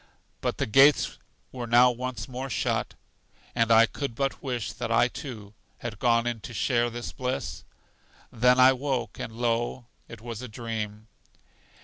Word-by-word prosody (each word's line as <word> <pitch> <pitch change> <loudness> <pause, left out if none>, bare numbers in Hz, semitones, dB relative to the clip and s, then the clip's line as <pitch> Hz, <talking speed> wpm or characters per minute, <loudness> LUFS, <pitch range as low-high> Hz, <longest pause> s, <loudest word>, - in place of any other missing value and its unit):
But - - -1
the - - 0
gates 135 +6 +4 0.3
were 125 -2 -5
now 120 +2 +6
once 125 -3 -5
more 130 +1 -5
shut, - - -1 0.6
and 115 -1 +1
I 115 0 +8
could 135 0 -5
but 135 +2 -2
wish 125 -5 -3
that 120 -1 -4
I, 115 +1 +4
too, 120 -7 -8 0.2
had 110 0 -6
gone 115 -1 +3
in 120 -1 -2
to 120 +2 -9
share 120 -1 +1
this 120 +1 -6
bliss. 125 - -4 0.7
Then 125 +2 +4
I 130 +1 +8
woke, 125 -5 -3
and, - - -5
lo, 120 +1 -1 0.2
it 115 - -10
was 115 0 -7
a 125 - -6
dream. 110 -2 -5
120 Hz, 160 wpm, -27 LUFS, 115-125 Hz, 0.7 s, I